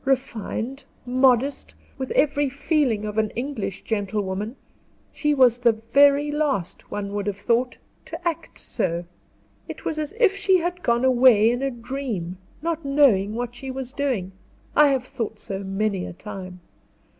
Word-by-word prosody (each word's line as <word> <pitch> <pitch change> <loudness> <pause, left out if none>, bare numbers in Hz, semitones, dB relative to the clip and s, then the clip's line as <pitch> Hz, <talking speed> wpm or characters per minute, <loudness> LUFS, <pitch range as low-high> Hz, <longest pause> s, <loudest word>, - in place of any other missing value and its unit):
Refined, 265 0 -2 0.2
modest, 255 +2 +2 0.2
with 265 - -3
every 290 -1 +2
feeling 275 -6 0
of 210 +1 -2
an 215 -1 +1
English 240 -6 -4
gentlewoman, 205 +1 -2 0.6
she 295 -1 0
was 250 -3 +5
the 240 -2 +4
very 280 +6 +4
last, 280 - -2
one 200 -1 -4
would 205 0 -2
have 200 -1 -2
thought, 235 +5 0 0.3
to 345 - -5
act 335 -1 -4
so. 170 -1 -2 0.6
It - - -8
was 310 - -2
as 305 +3 -3
if 430 -5 +4
she 395 -2 +3
had 355 +1 -3
gone 235 -2 +2
away 245 -4 +6
in 245 +1 -2
a 275 - +1
dream, 235 -8 -5 0.2
not 330 -1 -2
knowing 260 -8 +3
what 240 0 -3
she 265 +2 -8
was 260 0 -5
doing; 255 -11 -1 0.4
I 300 - +7
have 270 -3 +1
thought 225 -3 -5
so 195 -2 -5
many 195 -1 -2
a - - -7
time. 185 -2 -9
245 Hz, 155 wpm, -24 LUFS, 210-280 Hz, 0.6 s, I